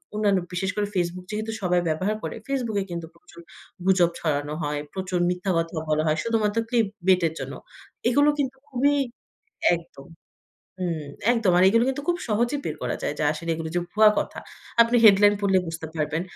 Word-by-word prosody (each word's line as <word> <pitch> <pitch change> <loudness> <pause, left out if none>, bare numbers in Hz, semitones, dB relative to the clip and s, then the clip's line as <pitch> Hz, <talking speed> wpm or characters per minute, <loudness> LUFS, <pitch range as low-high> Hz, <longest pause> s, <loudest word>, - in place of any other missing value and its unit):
অন্যান্য 205 -2 +2
বিশেষ 190 +2 -1
করে 210 -1 0
Facebook 180 0 -2
যেহেতু 215 +1 -3
সবাই 180 -1 +2
ব্যবহার 185 +7 0
করে - - -4
Facebook 250 -6 -1
এ - - -1
কিন্তু 170 -1 -5
প্রচুর 170 0 -16 0.4
গুজব 185 -3 +4
ছড়ানো 145 -2 -1
হয়, 145 0 -2
প্রচুর 185 -1 -2
মিথ্যা 180 +2 -1
কথা 165 0 -2
বলা 155 0 +2
হয়, 155 0 +2
শুধুমাত্র 225 -2 0
ক্লিপ 230 -3 +2 0.2
বেটে 185 -3 +4
জন্য। - - -5 0.6
এগুলো 285 +4 +4
কিন্তু 270 -1 -1
খুবই 280 +2 +2 0.8
একদম। 165 -5 -12 0.7
হুম, 165 -4 -2 0.3
একদম, 230 -6 +2
আর 180 - +5
এগুলো 230 +3 +4
কিন্তু 270 +2 -3
খুব 350 0 +2
সহজেই 240 +6 0
বের - - -2
করা - - -2
যায়। - - -1
যা 150 - +1
আসলে 165 +2 -6
এগুলো 160 0 -5
যে - - +3
ভুয়া 215 0 +6
কথা। - - -5 0.4
আপনি 235 +1 +3
হেডলাইন 205 0 +7
পড়লে 195 -2 +3
বুঝতে 165 -1 -5
পারবেন। 155 +1 -1
190 Hz, 180 wpm, -25 LUFS, 165-225 Hz, 0.8 s, হেডলাইন